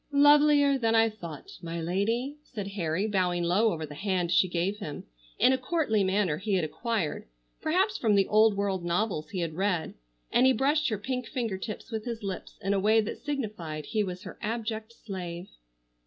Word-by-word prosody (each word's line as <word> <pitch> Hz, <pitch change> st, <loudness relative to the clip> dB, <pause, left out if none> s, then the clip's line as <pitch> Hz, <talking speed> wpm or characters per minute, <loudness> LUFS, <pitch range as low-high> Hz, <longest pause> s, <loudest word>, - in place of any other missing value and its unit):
"Lovelier 290 Hz, -1 st, +5 dB
than 225 Hz, -2 st, +2 dB
I 225 Hz, 0 st, +5 dB
thought, 170 Hz, -9 st, -9 dB
my 170 Hz, 0 st, -4 dB
lady," 225 Hz, -, -1 dB
said 205 Hz, -8 st, -6 dB
Harry, 185 Hz, -1 st, -1 dB
bowing 180 Hz, -4 st, +1 dB
low 200 Hz, +6 st, +3 dB
over 160 Hz, -3 st, -3 dB
the 145 Hz, -, -10 dB
hand 180 Hz, +1 st, -1 dB
she 185 Hz, +2 st, +4 dB
gave 180 Hz, +3 st, -1 dB
him, 155 Hz, -8 st, -6 dB, 0.3 s
in 260 Hz, -, +5 dB
a 260 Hz, -, 0 dB
courtly 255 Hz, -, +1 dB
manner 190 Hz, -5 st, +1 dB
he 200 Hz, +2 st, -1 dB
had 180 Hz, -4 st, +1 dB
acquired, 210 Hz, -, -2 dB, 0.3 s
perhaps 375 Hz, +6 st, +1 dB
from 215 Hz, -3 st, +3 dB
the 195 Hz, -1 st, +3 dB
old 215 Hz, -1 st, +4 dB
world 195 Hz, -3 st, -1 dB
novels 175 Hz, -2 st, -1 dB
he 185 Hz, -3 st, -3 dB
had 165 Hz, -2 st, -2 dB
read, 185 Hz, -1 st, -1 dB, 0.4 s
and 250 Hz, +2 st, +5 dB
he 260 Hz, -, +5 dB
brushed 290 Hz, +5 st, +2 dB
her 215 Hz, -, -1 dB
pink 250 Hz, +3 st, -3 dB
finger 230 Hz, -8 st, -3 dB
tips 215 Hz, +4 st, -6 dB
with 220 Hz, -1 st, -4 dB
his 230 Hz, -2 st, -5 dB
lips 190 Hz, -2 st, -5 dB
in 195 Hz, +1 st, +1 dB
a 200 Hz, -, +2 dB
way 215 Hz, +3 st, +4 dB
that 215 Hz, -, -2 dB
signified 205 Hz, -, -4 dB
he 215 Hz, +3 st, 0 dB
was 185 Hz, 0 st, -5 dB
her 185 Hz, -, -9 dB
abject 220 Hz, 0 st, -3 dB
slave. 185 Hz, -5 st, -7 dB
205 Hz, 195 wpm, -28 LUFS, 180-235 Hz, 0.4 s, Lovelier